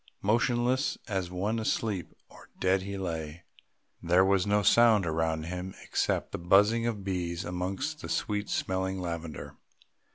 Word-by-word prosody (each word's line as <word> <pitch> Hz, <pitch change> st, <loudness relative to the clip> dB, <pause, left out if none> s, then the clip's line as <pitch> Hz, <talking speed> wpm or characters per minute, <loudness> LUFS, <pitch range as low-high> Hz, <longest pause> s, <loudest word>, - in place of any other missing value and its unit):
Motionless 120 Hz, +5 st, +1 dB
as 95 Hz, -5 st, -2 dB
one 100 Hz, +5 st, -1 dB
asleep 110 Hz, -4 st, -1 dB, 0.2 s
or -, -, -16 dB
dead 95 Hz, +1 st, +2 dB
he 100 Hz, +1 st, -5 dB
lay. 80 Hz, -3 st, -5 dB, 0.6 s
There 90 Hz, +2 st, +4 dB
was 95 Hz, 0 st, +2 dB
no 105 Hz, 0 st, +2 dB
sound 110 Hz, -3 st, +5 dB
around 80 Hz, -1 st, 0 dB
him 90 Hz, +3 st, -5 dB
except -, -, -1 dB
the -, -, -4 dB
buzzing 105 Hz, +6 st, +4 dB
of 105 Hz, -4 st, -3 dB
bees 90 Hz, -2 st, -3 dB
amongst 95 Hz, -, -3 dB
the -, -, -7 dB
sweet 105 Hz, 0 st, -1 dB
smelling 95 Hz, 0 st, -1 dB
lavender. 85 Hz, -3 st, -6 dB
95 Hz, 140 wpm, -29 LUFS, 85-105 Hz, 0.6 s, sound